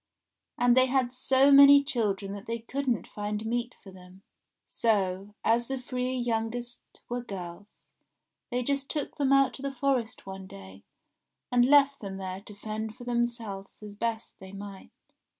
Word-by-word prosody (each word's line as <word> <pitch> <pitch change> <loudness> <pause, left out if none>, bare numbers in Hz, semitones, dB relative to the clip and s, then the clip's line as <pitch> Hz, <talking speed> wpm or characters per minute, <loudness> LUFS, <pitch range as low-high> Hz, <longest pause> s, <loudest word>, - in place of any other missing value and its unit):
And 245 0 +4
they 255 0 +5
had 255 -1 +1
so 265 +2 +3
many 280 0 +9
children 205 -7 -1
that 200 0 -9
they 230 0 -2
couldn't 250 +1 -2
find 210 +1 -4
meat 240 +2 -2
for 195 - -11
them; 185 +1 -15 0.4
so, 200 -2 0
as 235 +1 +2
the 270 -1 -3
three 250 0 -3
youngest 240 0 -3 0.2
were 245 0 -3
girls, 195 -3 -9 0.6
they 250 -1 -1
just 275 +1 -1
took 300 -2 -4
them 275 -2 +1
out 275 -1 +4
to - - -9
the 275 0 -4
forest 250 -3 -1
one 190 0 -8
day, 95 - -12 0.7
and 245 0 +5
left 280 0 +5
them 195 -2 -6
there 190 0 -5
to 210 0 -11
fend 215 +1 -5
for - - -11
themselves 235 -5 -3
as 210 -1 -8
best 225 +1 -4
they 190 0 -11
might. 195 -1 -9
235 Hz, 165 wpm, -28 LUFS, 200-255 Hz, 0.7 s, many